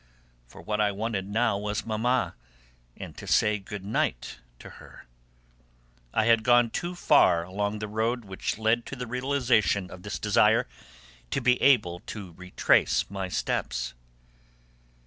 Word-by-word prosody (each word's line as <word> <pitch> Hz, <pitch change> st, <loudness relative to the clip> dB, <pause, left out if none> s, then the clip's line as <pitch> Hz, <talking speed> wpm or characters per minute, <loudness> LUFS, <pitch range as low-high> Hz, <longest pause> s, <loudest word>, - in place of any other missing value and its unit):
For -, -, -14 dB
what 105 Hz, 0 st, -1 dB
I 105 Hz, -1 st, +2 dB
wanted 100 Hz, -1 st, -3 dB
now 110 Hz, -1 st, +1 dB
was 105 Hz, +2 st, -3 dB
Mamma, 115 Hz, -2 st, 0 dB, 0.6 s
and -, -, -9 dB
to -, -, -9 dB
say 105 Hz, 0 st, +2 dB
good 100 Hz, 0 st, -8 dB
night 65 Hz, -, -2 dB, 0.2 s
to -, -, -12 dB
her. -, -, -14 dB, 1.1 s
I 110 Hz, -, +1 dB
had 115 Hz, -1 st, +4 dB
gone 120 Hz, 0 st, +4 dB
too 175 Hz, +8 st, -4 dB
far 140 Hz, -, +4 dB
along 100 Hz, +4 st, -3 dB
the 105 Hz, 0 st, -5 dB
road 115 Hz, +2 st, -1 dB
which 95 Hz, +1 st, -4 dB
led 110 Hz, +2 st, +1 dB
to -, -, -6 dB
the 125 Hz, -1 st, -5 dB
realisation 125 Hz, -6 st, +1 dB
of 90 Hz, -, -10 dB
this 105 Hz, -, -5 dB
desire 105 Hz, -, +3 dB, 0.6 s
to -, -, -1 dB
be 125 Hz, -1 st, +2 dB
able 105 Hz, -11 st, +3 dB
to 100 Hz, -5 st, -7 dB
retrace 90 Hz, +2 st, +1 dB
my 95 Hz, -2 st, -4 dB
steps. -, -, -2 dB
105 Hz, 145 wpm, -27 LUFS, 95-120 Hz, 1.1 s, had